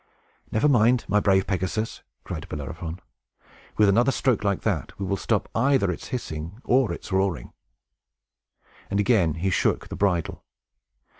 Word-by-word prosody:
"Never 110 +7 +2
mind, 120 -2 +4
my 105 - +3
brave 95 -2 +3
Pegasus!" 95 +4 -2 0.2
cried 80 -3 -6
Bellerophon. 80 +4 -6 0.8
"With 105 - +5
another 120 +7 +4
stroke 125 -4 +1
like 100 -2 0
that, - - -2
we 100 - -2
will 100 - 0
stop - - -1
either 130 -5 +2
its 85 - -7
hissing 85 -4 -5
or 130 -2 +3
its - - -7
roaring." 95 -9 -1 1.4
And 100 - 0
again 100 -7 +3
he 95 +3 -1
shook - - 0
the - - -5
bridle. 90 -5 0
100 Hz, 145 wpm, -25 LUFS, 90-115 Hz, 1.4 s, With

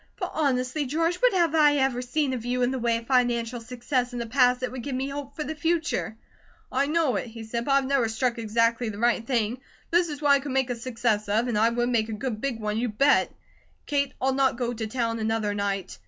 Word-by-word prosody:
"But 365 -4 -4
honestly, 275 -1 0
George, 330 +5 0
what - - +4
have 340 -4 +2
I 300 -2 +5
ever 265 -3 +1
seen 265 +2 -1
of 245 -3 -4
you 250 +1 0
in 245 - +2
the 265 - -2
way 235 -1 +1
of 230 - -8
financial 240 -2 +1
success 245 +1 -2
in - - -4
the 235 - -3
past 250 +1 +3
that 255 - -2
would 255 -1 -6
give 275 +1 -4
me 265 +2 -2
hope 280 0 -6
for 305 - -3
the 315 - -4
future?" 320 -7 -1 0.5
"I 280 - +1
know 305 -7 +1
it," 245 - -4
he 225 0 -9
said, 235 +2 -3
"but 275 - +2
I've 275 -1 +3
never 260 -4 +1
struck 235 +1 -1
exactly 230 +1 +1
the 205 - -7
right 235 +1 +2
thing. 235 -1 0 0.3
This 345 0 +3
is 295 -2 -5
what 290 -1 +3
I 280 - +6
could 275 -1 -5
make 265 -1 +1
a - - -1
success 230 -3 -1
of, 220 +4 +1
and 240 - -1
I 220 +2 +4
would 240 +1 0
make 225 -2 +1
a - - -3
good 215 0 -4
big 260 -5 -2
one, 210 0 -2
you 245 +1 -1
bet! 275 +7 +3 0.5
Kate, 280 -1 0
I'll 265 0 +1
not 265 -2 +2
go 245 -1 -1
to 220 -1 -4
town 230 0 -2
another 220 -1 0
night. 200 -2 -3
250 Hz, 250 wpm, -26 LUFS, 230-275 Hz, 0.5 s, I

